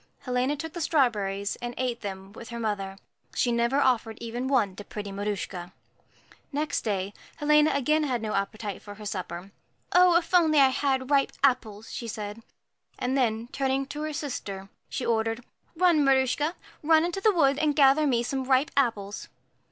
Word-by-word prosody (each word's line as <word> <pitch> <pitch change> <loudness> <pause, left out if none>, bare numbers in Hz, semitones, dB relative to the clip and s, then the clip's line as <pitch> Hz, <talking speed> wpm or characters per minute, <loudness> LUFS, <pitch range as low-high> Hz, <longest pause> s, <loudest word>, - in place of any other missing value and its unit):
Helena 255 +3 0
took 320 +2 -6
the 345 - -5
strawberries, 210 -10 +1
and 240 0 -6
ate 250 -2 -2
them 195 -1 -6
with 230 0 -10
her 235 0 -6
mother. 200 -3 -3 0.4
She 245 - +2
never 235 +3 +1
offered 235 -5 +2
even 235 +2 -4
one 235 -9 +2
to 205 - -7
pretty 205 -1 -7
Maruschka. 195 -3 -4 0.8
Next 300 +1 -1
day, 200 -2 -2 0.2
Helena 300 +1 +4
had - - +1
again 280 -3 +1
no 215 - -2
appetite 200 +1 -3
for 205 -1 -10
her 210 +1 -10
supper. 185 -1 -5 0.4
'Oh, 360 -1 +6
if 340 +1 -3
I 320 -4 +5
had 265 0 +1
only 260 - -10
ripe 275 -1 +3
apples!' 225 -6 +1
she 235 - -5
said; 210 0 -6 0.6
and 255 +2 -1
then, 230 -3 +1
turning 270 0 0
to 295 - -5
her 310 0 -2
sister, 200 -10 -5 0.2
she 255 - -3
ordered, 225 +1 0 0.3
'Run, 335 -3 +4
Maruschka, 275 +4 +2 0.3
run 315 +1 +4
into 350 +3 -3
the 435 - +5
wood 280 -6 +3
and 305 -2 +1
gather 285 +2 +5
me 240 -3 +2
some 265 +2 -2
ripe 265 +4 +2
apples.' 215 -7 0
250 Hz, 175 wpm, -27 LUFS, 210-290 Hz, 0.8 s, Oh